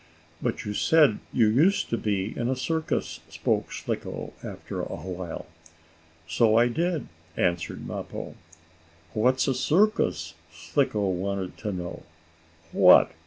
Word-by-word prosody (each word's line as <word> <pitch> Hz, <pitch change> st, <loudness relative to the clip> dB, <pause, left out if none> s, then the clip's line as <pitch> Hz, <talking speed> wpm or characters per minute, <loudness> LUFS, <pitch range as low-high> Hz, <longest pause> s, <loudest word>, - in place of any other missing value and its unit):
"But -, -, -2 dB
you 105 Hz, -, -3 dB
said 150 Hz, -1 st, +4 dB
you 115 Hz, -, +4 dB
used 155 Hz, -, +3 dB
to -, -, +2 dB
be 100 Hz, -1 st, -1 dB
in 120 Hz, +1 st, -1 dB
a 130 Hz, -, +1 dB
circus," 160 Hz, +5 st, -2 dB
spoke -, -, -1 dB
Slicko, -, -, -4 dB
after -, -, -6 dB
a -, -, -3 dB
while. 90 Hz, 0 st, -6 dB, 0.8 s
"So 110 Hz, +7 st, +3 dB
I 120 Hz, +1 st, +5 dB
did," 170 Hz, +4 st, -1 dB, 0.3 s
answered 85 Hz, -1 st, -1 dB
Mappo. -, -, -6 dB, 0.8 s
"What's 130 Hz, +4 st, +2 dB
a 135 Hz, -, +2 dB
circus?" 140 Hz, -, +2 dB, 0.2 s
Slicko 100 Hz, -, 0 dB
wanted 95 Hz, 0 st, -2 dB
to 105 Hz, -, -3 dB
know. 90 Hz, -2 st, -5 dB, 0.7 s
"What! 90 Hz, -2 st, +7 dB
110 Hz, 125 wpm, -26 LUFS, 90-135 Hz, 0.8 s, What